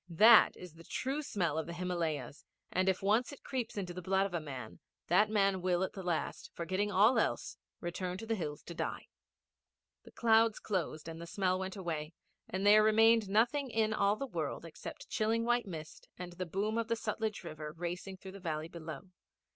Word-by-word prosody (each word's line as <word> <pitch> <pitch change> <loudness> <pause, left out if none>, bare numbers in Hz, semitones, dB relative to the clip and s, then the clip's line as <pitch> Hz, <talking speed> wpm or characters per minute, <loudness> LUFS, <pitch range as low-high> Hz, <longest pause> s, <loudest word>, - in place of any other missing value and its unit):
That 215 +7 +7
is 180 -3 -10
the 165 +1 -14
true 270 - -2
smell 175 - -1
of 160 - -4
the 170 - -5
Himalayas, 170 -5 -3 0.3
and 185 +1 +2
if 190 0 0
once 220 +7 +2
it 285 - -12
creeps 250 -5 -3
into 180 -3 -3
the 180 - -6
blood 190 +2 +2
of 195 - -5
a 170 - 0
man, 130 -7 -8 0.3
that 210 +5 +5
man 195 -3 +2
will 180 0 +1
at 190 - -3
the 195 - -6
last, 175 -3 -2
forgetting 185 +5 -1
all 210 +6 +5
else, - - -1 0.3
return 180 +1 -3
to 225 - -7
the 225 - 0
hills 155 -8 -4
to 170 - -8
die. - - -4 0.9
The - - -15
clouds 225 -1 +4
closed 170 -6 -3
and 165 0 -7
the 170 - -7
smell 185 0 0
went 190 +1 -4
away 165 -4 -4 0.4
and 190 +2 -2
there 210 +1 +8
remained 220 0 +5
nothing 240 +7 +2
in 220 -1 +1
all 200 -1 +3
the 275 - -4
world 265 - -4
except - - -9
chilling 225 +1 +1
white 240 -2 +1
mist 160 -4 -8
and 180 -1 -7
the 185 0 -5
boom 210 +6 -1
of 230 - -1
the 230 - +1
Sutlej 220 -2 -3
river 155 -2 -6
racing 175 +3 -5
through 190 0 -10
the 200 - -10
valley 160 -3 -3
below. 160 -4 -7
190 Hz, 200 wpm, -33 LUFS, 170-215 Hz, 0.9 s, there